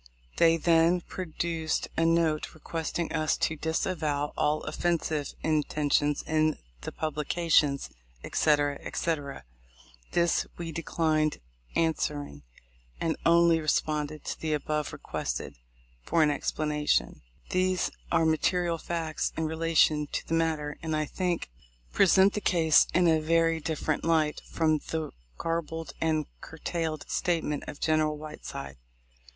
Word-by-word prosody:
They 165 0 +5
then 165 +2 +4
produced 165 -2 -3
a 165 - +2
note 165 -2 +1
requesting 165 +1 -3
us 155 -1 +1
to 160 - 0
"disavow" 155 -2 -1
all 150 +1 +1
offensive 155 -2 -1
intentions 150 -1 +1
in 155 -1 +1 0.2
the - - -5
publications, 155 -2 +1 0.3
etc., 145 -2 +2
etc. 145 -5 -3 0.7
This 170 0 +2
we 170 -1 -5
declined 155 -1 0 0.4
answering, 150 - -1 0.6
and 165 - 0
only 170 -1 +5
responded 155 -1 -1
to - - -4
the 155 -1 -1
above 150 0 -2
requested - - -4 0.5
for 165 - +2
an 150 - +3
explanation. 150 0 0 0.3
These 185 0 +1 0.2
are 165 - +3
the 160 - +4
material 170 +1 +1
facts 165 -2 -2
in 160 - 0
relation 160 -2 +2
to - - -3
the - - -3
matter, 160 -3 0
and 160 -1 -2
I 155 0 0
think 180 +2 -2 0.5
present 195 +1 +5
the 210 - -2
case 165 -5 +4
in 180 -1 +5
a 160 -1 +4
very 165 +1 +2
dif 160 0 -3
ferent 155 - -1
light 160 -2 +1
from 155 -2 +2
the 160 +1 -4 0.3
garbled 165 -2 -3
and 155 -2 +1 0.2
curtailed 160 -1 -4
statment 160 -4 -1
of 145 - -7
General 155 -1 +1
Whiteside. 70 - -8
160 Hz, 125 wpm, -28 LUFS, 150-165 Hz, 0.7 s, They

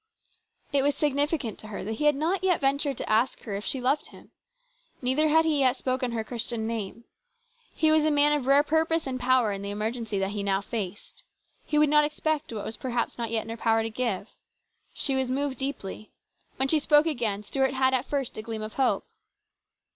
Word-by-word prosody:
It 280 - +4
was 285 +1 +2
significant 290 -4 0
to 215 - -10
her 215 - -6
that 210 - -4
he 260 +7 -2
had 295 -1 +5
not 335 +6 0
ventured 280 -6 +1
to - - -5
ask 225 +4 +1
her 210 - -5
if 200 - -4
she 265 - +1
loved 265 +4 0
him. - - -16 0.7
Neither 265 +5 +2
had 320 +1 +4
he 310 -3 +2
yet 260 -2 +4
spoken 255 -2 -1
her 225 -1 -1
Christian 235 -1 -3
name. 225 0 -4 0.7
He 315 -1 +3
was 310 -1 +4
a 310 - +3
man 295 0 +4
of 285 -4 -1
rare 280 +1 +6
purpose 320 +1 +1
and 260 -1 -3
power 250 -3 +3
in 195 -1 -4
the 200 - -5
emer 210 +2 -2
gency 225 -4 -4
that 195 0 -1
he 205 -1 -3
now 195 -1 +1
faced. 205 - -6 0.5
He 300 - 0
would 300 0 +5
not 300 0 +5
expect 300 -1 -2
what 215 -3 -5
was 220 - -5
perhaps 245 -2 -2
not 230 -1 -2
yet 225 -1 0
in 225 - -11
her 230 - -5
power 225 0 +2
to 225 - -4
give. 220 -4 -2 0.6
She 275 - 0
was 265 -1 0
moved 270 0 -2
deeply. 265 -6 -5 0.5
When 265 - 0
she 310 +2 +3
spoke 295 +1 +4
again, 230 -10 -1
Stuart 265 +4 0
had 260 0 +3
at 260 0 0
first 275 -4 -2
a - - -3
gleam 220 -1 -5
of 215 0 -6
hope. 265 -2 +1
260 Hz, 215 wpm, -27 LUFS, 225-290 Hz, 0.7 s, rare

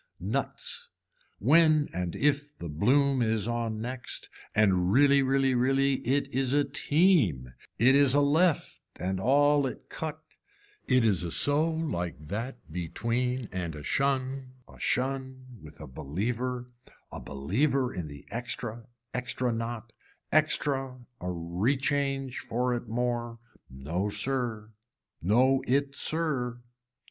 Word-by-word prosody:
Nuts, 485 -1 -4 0.5
when 155 -2 +4
and 90 -1 -3
if 145 +1 0
the 85 - -6
bloom 130 - +2
is 110 -2 +1
on 115 -2 -2
next 125 +2 -6 0.3
and 95 -4 +3
really 140 +3 +5
really 135 0 +2
really, 135 +2 +2
it 135 +4 0
is 130 0 +1
a 145 0 +4
team, 140 - +2 0.2
it 125 +5 +5
is 140 -1 +5
a - - +5
left 155 +4 +2
and 95 +1 -2
all 145 +4 +4
it - - -8
cut, 155 -1 -5 0.7
it 130 -3 +4
is 100 -6 +3
a 85 - -3
so 145 - +2
like 150 - -2
that 105 - -6
between 115 +8 -2
and 85 -4 -4
a 75 - -8
shun 135 - -1
a - - -16
shun 130 0 -2 0.2
with 75 -1 -13
a - - -7
believer, 115 - -3 0.4
a - - -6
believer 125 - 0
in 90 -5 -4
the 70 -1 -11
extra, 115 0 -4 0.3
extra 125 -1 -1
not, 115 0 -5 0.4
extra 140 -4 +2 0.2
a 90 - -6
rechange 135 - -1
for 125 +2 -1
it 120 -1 -4
more. 120 0 -2 0.3
No 80 +10 -3
sir. 110 -1 -2 0.5
No 130 +9 +3
it 140 +2 +1
sir. 140 -8 0
125 Hz, 130 wpm, -28 LUFS, 105-140 Hz, 0.7 s, really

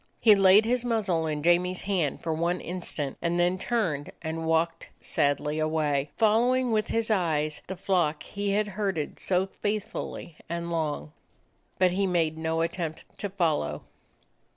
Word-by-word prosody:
He 220 - +7
laid 195 +2 +6
his 245 +1 +1
muzzle 200 -9 0
in 150 -1 -2
Jamie's 180 +2 +2
hand 180 -8 -1
for 165 - -1
one 170 +3 0
instant, 170 -5 -4
and 170 +1 0
then 180 +1 +2
turned 180 - -1
and 160 0 -3
walked 165 +1 0
sadly 145 +2 0
away, 150 -2 0
following 240 +3 +3
with 215 -1 +1
his 225 -1 0
eyes 155 -6 0
the 190 - -4
flock 175 -5 0
he 200 0 -3
had 205 +1 +1
herded 190 -6 -2
so 185 0 +1
faithfully 200 -5 -4
and 170 0 -3
long. 150 - -2 0.7
But 185 -1 +4
he 195 +2 +1
made 165 -3 +1
no 160 0 -1
attempt 165 -1 -3 0.2
to 205 - -3
follow. 155 - 0
175 Hz, 150 wpm, -27 LUFS, 160-200 Hz, 0.7 s, He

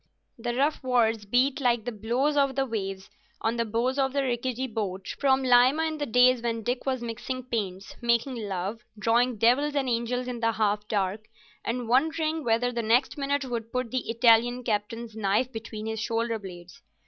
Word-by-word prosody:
The 240 +1 -3
rough 285 +4 +1
words 225 -4 +1
beat 260 +6 +2
like 240 -4 +2
the 245 - -2
blows 240 +7 0
of 275 -2 +2
the 270 0 +1
waves 195 -5 -4 0.3
on 225 +1 -1
the 230 - +1
bows 240 +5 -1
of 265 -1 +1
the 280 -1 +1
rickety 255 0 -1
boat 200 -5 -4
from 265 -1 +3
Lima 255 +5 +5
in 315 -1 -2
the 290 - -2
days 250 +1 +5
when 230 -1 -2
Dick 245 +4 -2
was 260 -2 -1
mixing 240 +3 -4
paints, 195 -6 -4
making 235 +2 +1
love, 195 +3 -3 0.2
drawing 235 +2 +2
devils 260 +7 +3
and 275 -2 0
angels 245 +1 -1
in 245 -1 -4
the 230 0 +1
half 210 -1 0
dark, 205 +1 -1 0.4
and 240 0 -3
wondering 315 +5 +1
whether 240 +1 +1
the 235 -1 -2
next 235 +4 +2
minute 280 -1 -1
would 230 -2 -4
put 250 -2 -2
the 255 -3 -2
Italian 235 +1 +4
captain's 225 +1 -3
knife 215 +4 +1
between 220 -1 -7
his 220 0 -3
shoulder 230 0 -1
blades. 180 -3 -11
235 Hz, 185 wpm, -27 LUFS, 220-255 Hz, 0.4 s, Lima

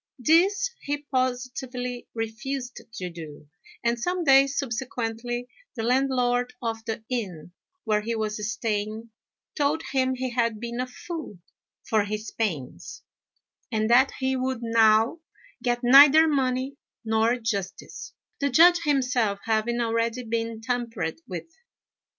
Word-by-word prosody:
This 375 - +3
he 290 +1 -2
positively 255 -2 -3
refused 245 +4 -4
to 180 -1 -4
do; 155 -3 -10 0.4
and 235 0 +1
some 355 +7 -1
days 275 -1 +5
subsequently 240 -1 -3 0.3
the 225 - -3
landlord 250 0 +1
of 225 -2 -3
the 225 -1 -4
inn, 185 -10 -4 0.3
where 210 -1 +1
he 230 +2 -2
was 215 -1 -2
staying, 220 +1 -3 0.4
told 295 +2 +1
him 260 -1 +1
he 255 0 -3
had 230 -3 0
been 235 +1 -5
a 255 - -1
fool 310 - -7 0.5
for 215 -2 +2
his 215 +2 -5
pains, 160 - -4 0.7
and 220 0 0
that 260 +3 +5
he 265 0 0
would 255 -2 -2
now 225 +4 +4 0.4
get 240 -1 0
neither 285 +5 +8
money 265 -1 0 0.3
nor 220 +2 +2
justice, 210 -6 -4 0.3
the 280 - +1
Judge 345 +6 +6
himself 250 -8 +1
having 225 +2 0
already 230 +1 0
been 230 -1 -3
tampered 230 -9 -3
with. 180 -3 -5
240 Hz, 125 wpm, -26 LUFS, 220-260 Hz, 0.7 s, neither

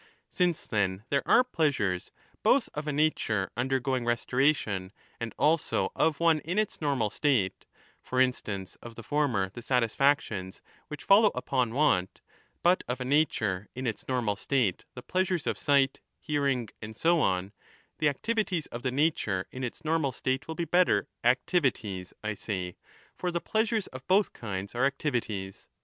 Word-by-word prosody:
Since, 175 -3 0
then, 100 -2 -1
there 140 -1 +2
are 250 - +6
pleasures 140 - 0 0.3
both 270 -1 +3
of 150 +1 -5
a - - +1
nature 140 -10 0
under 130 +3 0
going 130 -1 -1
restoration 120 -5 +1 0.3
and 115 -1 -4
also 160 +1 +2
of 160 -3 +2
one 165 -2 +4
in 175 +6 -4
its 215 -5 -1
normal 135 -8 0
state, 125 -11 0 0.3
for 130 - -2
instance 105 -7 0
of 120 -1 -10
the 120 - -9
former 125 -11 0
the 120 - -8
satisfactions 115 -5 +1 0.3
which 150 -1 -8
follow 205 +2 +6
upon 125 -2 -1
want, 115 -11 +2 0.4
but 180 +2 +4
of 125 +1 -2
a 125 - -3
nature 110 -9 +1
in 130 +1 -4
its 115 -4 -3
normal 120 -5 0
state 115 -3 0
the 125 - -8
pleasures 185 -3 0
of - - 0
sight, 140 -2 +2 0.2
hearing, 140 -6 0
and 110 0 -8
so 170 +1 +3
on, 95 -6 0 0.5
the 150 - +4
activities 195 - -1
of 120 - -7
the 130 - 0
nature 130 - +1
in 130 - -6
its 125 +5 -6
normal 155 -3 +1
state 130 +1 -2
will 160 - -5
be 170 - -2
better 175 - +3
— - - -53
'activities' 120 - +1
I 110 0 -1
say, 95 -3 -4 0.4
for 180 - -2
the 170 0 -1
pleasures 220 +1 0
of 130 0 -11
both 195 +2 +3
kinds 100 -3 -5
are 120 +2 0
activities. 115 -9 -3
130 Hz, 165 wpm, -29 LUFS, 110-155 Hz, 0.5 s, are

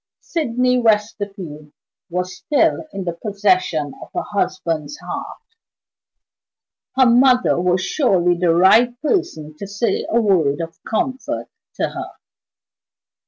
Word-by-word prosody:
Sydney 250 -5 0
Westerfield 205 -9 -1 0.4
was 180 +1 -3
still 320 +1 +1
in 195 -1 -5 0.2
possession 185 - +1
of - - -10
her - - -1
husband's 185 - -2
heart! - - -7 1.5
Her 260 - +6
mother 250 -5 +4
was 180 +1 +1
surely 180 - +2
the 170 -1 +2
right 235 +7 +5
person 295 - -1
to 200 - -6
say 205 +4 -1
a 235 - +3
word 170 -10 +2
of 165 0 -5
comfort 260 +4 -2 0.3
to - - -1
her. - - -7
200 Hz, 115 wpm, -20 LUFS, 175-245 Hz, 1.5 s, Her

